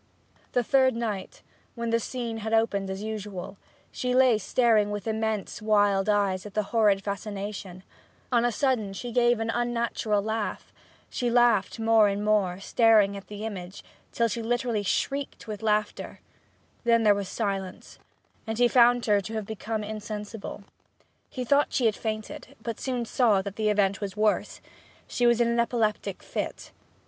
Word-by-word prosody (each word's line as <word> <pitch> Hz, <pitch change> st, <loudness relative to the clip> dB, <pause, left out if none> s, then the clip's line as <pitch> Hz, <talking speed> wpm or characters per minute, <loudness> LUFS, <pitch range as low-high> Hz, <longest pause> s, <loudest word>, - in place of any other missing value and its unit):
The 245 Hz, -, +2 dB
third 260 Hz, 0 st, +3 dB
night, 215 Hz, -5 st, -4 dB, 0.3 s
when 235 Hz, -1 st, -3 dB
the 230 Hz, -, +3 dB
scene 235 Hz, -1 st, -4 dB
had 220 Hz, +1 st, -1 dB
opened 200 Hz, -4 st, +1 dB
as 190 Hz, +2 st, -5 dB
usual, 210 Hz, -4 st, -5 dB
and 195 Hz, -, -15 dB, 0.3 s
she 250 Hz, 0 st, -2 dB
lay 255 Hz, -4 st, +5 dB
staring 220 Hz, -1 st, +2 dB
with 205 Hz, -1 st, -4 dB
immense 220 Hz, -3 st, -2 dB
wild 205 Hz, -2 st, +2 dB
eyes 200 Hz, -2 st, +1 dB
at 205 Hz, -1 st, -11 dB
the 215 Hz, -, +1 dB
horrid 205 Hz, -4 st, +3 dB
fascination, 200 Hz, -2 st, -5 dB, 0.5 s
on 240 Hz, -1 st, +3 dB
a 240 Hz, -, +2 dB
sudden 230 Hz, -5 st, 0 dB
she 240 Hz, +5 st, -6 dB
gave 240 Hz, 0 st, +3 dB
an 225 Hz, 0 st, -1 dB
unnatural 235 Hz, -3 st, -1 dB
laugh; 220 Hz, 0 st, -3 dB, 0.4 s
she 245 Hz, -, -1 dB
laughed 235 Hz, -4 st, +3 dB
more 225 Hz, -1 st, +5 dB
and 200 Hz, +1 st, -2 dB
more, 195 Hz, -4 st, +1 dB
staring 210 Hz, -1 st, +4 dB
at 195 Hz, -, -9 dB
the 210 Hz, +1 st, -7 dB
image, 190 Hz, -3 st, -7 dB, 0.3 s
till 235 Hz, -, +1 dB
she 230 Hz, +1 st, -3 dB
literally 240 Hz, -1 st, -1 dB
shrieked 275 Hz, +7 st, -2 dB
with 210 Hz, -2 st, -6 dB
laughter: 210 Hz, -1 st, -1 dB, 0.6 s
then 230 Hz, -1 st, +3 dB
there 210 Hz, -1 st, +6 dB
was 200 Hz, -1 st, -4 dB
silence, 195 Hz, -4 st, -4 dB, 0.5 s
and 220 Hz, 0 st, -3 dB
he 245 Hz, 0 st, +5 dB
found 245 Hz, 0 st, +4 dB
her 205 Hz, -2 st, +3 dB
to 220 Hz, +3 st, -7 dB
have 215 Hz, -2 st, -3 dB
become 220 Hz, +1 st, -4 dB
insensible. 210 Hz, -1 st, -6 dB, 0.7 s
He 255 Hz, -1 st, -5 dB
thought 285 Hz, +4 st, +2 dB
she 255 Hz, -, +1 dB
had 220 Hz, -2 st, +3 dB
fainted, 215 Hz, -1 st, -5 dB
but 230 Hz, -2 st, -4 dB
soon 250 Hz, -3 st, -2 dB
saw 220 Hz, -5 st, +2 dB
that 200 Hz, 0 st, -6 dB
the 215 Hz, -1 st, 0 dB
event 200 Hz, -1 st, +1 dB
was 200 Hz, 0 st, -5 dB
worse: 215 Hz, 0 st, 0 dB, 0.5 s
she 245 Hz, -, +1 dB
was 235 Hz, -1 st, +4 dB
in 235 Hz, -, +3 dB
an 235 Hz, 0 st, +1 dB
epileptic 230 Hz, -3 st, -1 dB
fit. -, -, -5 dB
220 Hz, 170 wpm, -27 LUFS, 205-235 Hz, 0.7 s, there